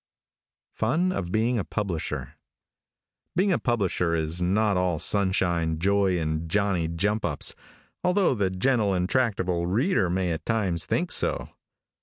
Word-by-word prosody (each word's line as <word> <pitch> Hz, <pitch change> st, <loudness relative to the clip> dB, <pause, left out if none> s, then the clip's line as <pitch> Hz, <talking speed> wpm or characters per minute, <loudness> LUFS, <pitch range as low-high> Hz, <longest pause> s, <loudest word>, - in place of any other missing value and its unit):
FUN 165 Hz, +12 st, +1 dB
OF 90 Hz, -, -3 dB
BEING 115 Hz, +3 st, +1 dB
A -, -, -1 dB
PUBLISHER. 95 Hz, -7 st, -3 dB, 1.0 s
|BEING 190 Hz, +3 st, +2 dB
a 175 Hz, -, +2 dB
publisher 95 Hz, -8 st, 0 dB
is 80 Hz, +2 st, -2 dB
not 100 Hz, +3 st, +2 dB
all 90 Hz, -2 st, +1 dB
sunshine, 85 Hz, -3 st, +1 dB
joy 95 Hz, +1 st, +2 dB
and 80 Hz, 0 st, -2 dB
johnny 100 Hz, -3 st, +1 dB
jump 100 Hz, +6 st, -1 dB
ups, 75 Hz, -5 st, 0 dB, 0.5 s
although 180 Hz, -3 st, +3 dB
the 100 Hz, -5 st, 0 dB
gentle 100 Hz, +1 st, +1 dB
and 90 Hz, 0 st, 0 dB
tractable 95 Hz, -8 st, 0 dB
reader 110 Hz, -, +1 dB
may 90 Hz, 0 st, 0 dB
at 80 Hz, -, -4 dB
times 100 Hz, -7 st, 0 dB
think -, -, 0 dB
so. -, -, -1 dB
95 Hz, 140 wpm, -26 LUFS, 85-110 Hz, 1.0 s, although